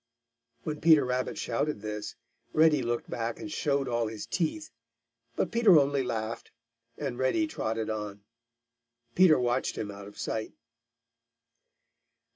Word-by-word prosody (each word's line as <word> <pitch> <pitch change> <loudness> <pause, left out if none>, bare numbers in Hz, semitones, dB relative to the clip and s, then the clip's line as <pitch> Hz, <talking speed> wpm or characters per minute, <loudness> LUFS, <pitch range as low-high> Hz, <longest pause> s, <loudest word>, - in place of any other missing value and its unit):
When 150 -1 -4
Peter 155 -4 +6
Rabbit 125 0 -2
shouted 115 -1 -2
this, 105 -1 -5 0.4
Reddy 155 -2 +5
looked 120 -1 -2
back 115 0 -3
and 160 -1 -7
showed 140 -3 0
all 120 -2 0
his 110 -1 -6
teeth, 160 -2 -2 0.6
but - - -1
Peter 230 -7 +6
only 140 -1 +3
laughed, 115 -3 -4 0.5
and 135 -4 -4
Reddy 130 - +2
trotted 115 - -3
on. 105 -2 -5 0.9
Peter 180 -4 +6
watched 125 +1 0
him 105 -1 -3
out 100 0 -9
of 105 - -13
sight. 110 -1 -3
125 Hz, 130 wpm, -29 LUFS, 110-155 Hz, 0.9 s, Peter